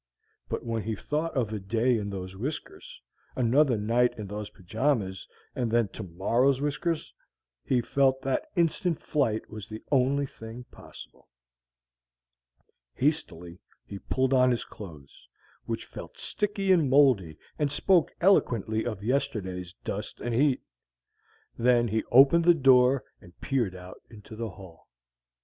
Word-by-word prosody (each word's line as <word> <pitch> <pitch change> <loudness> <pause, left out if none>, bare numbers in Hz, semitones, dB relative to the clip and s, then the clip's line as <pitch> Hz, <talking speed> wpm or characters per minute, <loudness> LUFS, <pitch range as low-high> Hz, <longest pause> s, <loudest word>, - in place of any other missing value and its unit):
But - - -4
when 115 -1 -2
he 110 +2 -3
thought 150 +7 -3
of 110 -4 0
a 105 - -3
day 115 +5 +1
in 100 -1 -4
those 95 -1 -6
whiskers, 380 - -6 0.4
another 130 +1 +3
night 115 +4 +1
in 105 - -5
those 105 +1 -6
pajamas, 105 0 -2 0.3
and 120 -2 -1
then 115 -2 +2
tomorrow's 115 +11 0
whiskers, 150 +3 -2 0.5
he 125 -2 +1
felt 135 +2 +2
that 135 -1 -1
instant 170 0 +1
flight 115 -8 -1
was 110 -2 -9
the 110 0 -8
only 140 +1 +2
thing 115 -1 -10
possible. - - -14 1.7
Hastily 90 - -2 0.3
he 100 - -8
pulled 130 +4 0
on 130 -1 +5
his 120 -2 -1
clothes, 75 -9 -12 0.4
which - - -4
felt - - -10
sticky 200 -2 -1
and 165 -7 +4
moldy 125 - +4 0.2
and 145 -2 +1
spoke 175 +4 +3
eloquently 115 - +2
of 105 -4 -5
yesterday's 105 -9 -2
dust 105 +2 -5
and 120 - -3
heat. 135 +2 +2 1.0
Then 120 -1 +3
he 110 +1 0
opened 140 +7 +6
the 175 -1 +7
door 130 -2 +5 0.2
and 85 -1 -18
peered 120 -9 -1
out 90 0 -11
into 110 0 -12
the 115 0 -4
hall. 95 -3 -14
120 Hz, 140 wpm, -27 LUFS, 105-140 Hz, 1.7 s, the